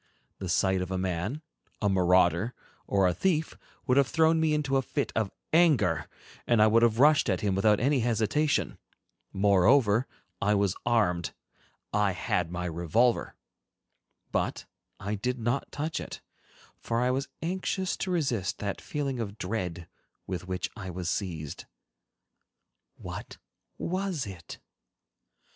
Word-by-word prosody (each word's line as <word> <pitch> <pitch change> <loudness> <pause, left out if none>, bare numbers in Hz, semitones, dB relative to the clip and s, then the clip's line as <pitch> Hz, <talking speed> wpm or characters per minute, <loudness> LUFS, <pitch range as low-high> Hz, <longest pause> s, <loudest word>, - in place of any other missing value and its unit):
The 95 - -4
sight 95 +1 +2
of 90 - -3
a 95 - -2
man, 95 - -2 0.4
a 105 - +1
marauder, 90 +2 +3 0.3
or 100 -2 +3
a 90 - +2
thief 160 - 0 0.3
would 130 -1 +2
have 140 -2 +5
thrown 160 +1 +3
me 160 -1 +2
into 135 -3 +1
a - - +2
fit - - -2
of 110 -3 +1 0.2
anger, 140 - +3 0.4
and 120 -2 +3
I 105 - +7
would 110 +2 +4
have 115 -2 +3
rushed 145 0 +5
at 95 -2 0
him 100 -2 +1
without 105 +2 +3
any 135 +3 +2
hesitation. 120 +6 +1 0.5
Moreover, 105 +5 +4 0.3
I 105 +1 +3
was 100 -2 +1
armed—I 105 -1 -1
had 90 -1 -1
my 90 0 -3
revolver. 85 +9 +1 1.0
But - - -1 0.3
I 100 +2 -3
did 125 +5 -2
not 120 +3 -2
touch 155 +2 -3
it, - - -7 0.6
for 115 0 -1
I 125 +1 +2
was 135 +2 -1 0.2
anxious 185 +2 -1
to 190 - -3
resist 130 - 0
that 100 -1 -4
feeling 140 -4 -3
of 105 -2 -4
dread 90 -5 -4 0.4
with 90 -1 -5
which 90 0 -3
I 95 -4 -6
was 90 -1 -3
seized. 80 -7 -4 1.3
What - - -8 0.4
was 185 -4 -2
it? 95 -5 -9
105 Hz, 140 wpm, -28 LUFS, 95-135 Hz, 1.3 s, I